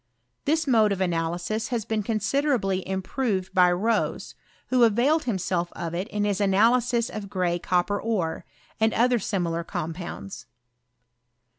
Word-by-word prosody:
This 315 +2 +1
mode 220 -6 +4
of 195 - -1
analysis 175 +4 -1
has 230 -3 -2
been 220 -1 -1
considerably 215 -2 0
improved 190 0 -2
by 180 -1 +5
Rose, 210 +5 -1 0.4
■who 250 -1 +4
availed 245 +8 +3
himself 185 -6 -1
of 170 -1 -5
it 180 +4 -2
in 210 -1 -2
his 205 -1 0
analysis 235 +4 +3
of 205 -2 -7
gray 180 -3 0
cop 175 0 +1
per 205 -1 -2
ore, 195 -8 -2 0.4
and 220 0 +2
other 245 +1 +3
similar 170 -5 -2
compounds. 165 - -6
205 Hz, 140 wpm, -25 LUFS, 180-230 Hz, 0.4 s, by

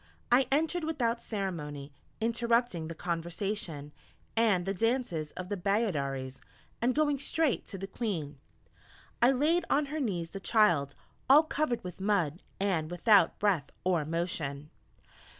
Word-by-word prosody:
I 255 +1 +5
entered 320 +4 +1
without 245 -7 -1
ceremony, 150 -9 -4 0.3
interrupting 235 -6 +1
the 165 - -6
conversation, 170 -3 -3 0.4
and 210 -6 +3
the 195 - -1
dances 225 -8 0
of 185 - -6
the 205 - -2
Bayaderes, 145 - -1 0.4
and 245 +2 +2
going 295 -2 +2
straight 305 -1 0
to 195 - -6
the 195 - -5
Queen, 170 - -4 0.8
I 240 - +7
laid 300 +7 +2
on 295 +1 +3
her 310 - -1
knees 180 - -2
the 195 - -6
child, 175 -11 +3 0.3
all 290 +4 +8
covered 305 -5 -1
with 180 +1 -8
mud, 185 -5 +1 0.2
and 180 -6 0
without 180 +1 +4
breath 190 -8 +1
or 180 -4 +2
motion. 155 -3 -2
195 Hz, 135 wpm, -30 LUFS, 165-240 Hz, 0.8 s, all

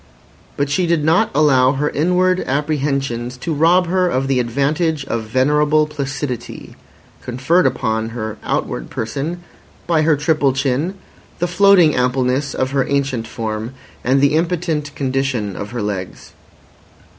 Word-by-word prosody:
But 140 0 -1
she 175 +5 +1
did 165 -3 +1
not 170 +8 +3
allow 135 -3 +4
her 145 +2 -1
inward 180 +4 +2
apprehensions 140 -4 -1
to 160 +6 -3
rob 170 +5 +4
her 180 +1 +1
of 135 -3 -1
the 135 -2 +1
advantage 140 +5 0
of 115 -4 -3
venerable 150 +6 +2
placidity 140 -4 -5 0.5
conferred 130 +7 +1
upon 110 -3 -1
her 110 -2 -5
outward - - -3
person 145 +10 -4 0.4
by 165 -2 +2
her 155 0 +3
triple 145 -2 +1
chin, 135 +7 -1 0.4
the 175 - 0
floating 180 -2 +5
ampleness 125 +2 0
of 130 0 -1
her 135 -1 0
ancient 135 -5 -1
form, 110 +2 -5 0.3
and 135 +3 +2
the 140 +1 +3
impotent 160 -3 -1
condition 130 -7 -1
of 100 - -6
her 120 -3 -4
legs. 95 -3 -5
140 Hz, 140 wpm, -18 LUFS, 125-155 Hz, 0.5 s, floating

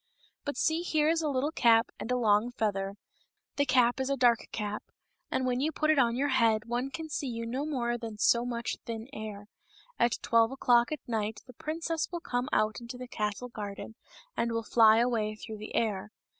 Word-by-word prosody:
" - - -35
But 285 - -3
see, 320 +1 +1
here 310 -3 +2
is 330 0 +2
a 310 - 0
little 280 +2 0
cap 230 -7 +4
and - - -5
a 250 - +2
long 215 -1 +3
feather 200 -5 -2 0.3
— - - -54
the 285 0 +2
cap 250 -1 +3
is 265 0 -1
a 275 - 0
dark 240 -2 +3
cap, 210 -1 -3 0.5
and 260 - 0
when 250 -1 0
you 300 +4 +1
put 310 0 +2
it 305 - +3
on 235 -2 +3
your 280 +3 +1
head 225 -4 +3
one 240 +3 -2
can 315 +4 -6
see 290 -2 -3
you 230 -2 -4
no 260 +6 -3
more 240 -5 -1
than 225 -2 -6
so 235 +3 +4
much 235 -1 -3
thin 225 0 -6
air. 210 -3 -7 0.5
At 235 -1 +3
twelve 230 0 +4
o'clock 245 -2 +3
at 305 -4 -5
night 220 -2 -2
the 250 - -13
princess 325 +4 -3
will 345 - -3
come 245 -6 -2
out 215 +2 +1
into 240 +1 -8
the 250 0 -7
castle 210 +1 -3
garden 210 -1 -7 0.4
and 235 0 0
will 230 0 -1
fly 220 0 +6
away 225 -3 +1
through 215 0 -8
the 215 - -7
air. 210 -3 0
240 Hz, 215 wpm, -30 LUFS, 220-265 Hz, 0.5 s, fly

